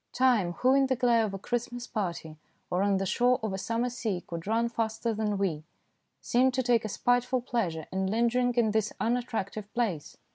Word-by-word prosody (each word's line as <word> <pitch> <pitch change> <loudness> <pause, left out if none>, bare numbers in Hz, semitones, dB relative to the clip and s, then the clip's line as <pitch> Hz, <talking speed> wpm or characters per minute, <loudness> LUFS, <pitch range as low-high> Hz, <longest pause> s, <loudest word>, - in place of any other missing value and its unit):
Time, 240 -9 +3
who 255 +8 +3
in 275 0 +4
the 260 - +1
glare 240 -2 +3
of 210 - -3
a 195 - -4
Christmas 240 +3 -3
party 170 -9 -4 0.4
or 180 - +1
on 200 -1 +2
the 195 - -1
shore 245 +6 +2
of 215 -3 -2
a - - -2
summer 230 +4 -1
sea 215 -7 -3
could 170 +1 -7
run 230 +2 +2
faster 225 0 -2
than 210 -1 -1
we, 170 -6 -1 0.6
seemed 255 +1 +2
to 260 - +1
take 240 -2 +3
a 215 - -3
spiteful 245 +4 +1
pleasure 205 -10 -2
in 190 0 -1
lingering 235 +4 +2
in 230 -3 +3
this 220 0 0
unattractive 220 -3 -2
place. 205 -11 -2
225 Hz, 195 wpm, -29 LUFS, 195-245 Hz, 0.6 s, in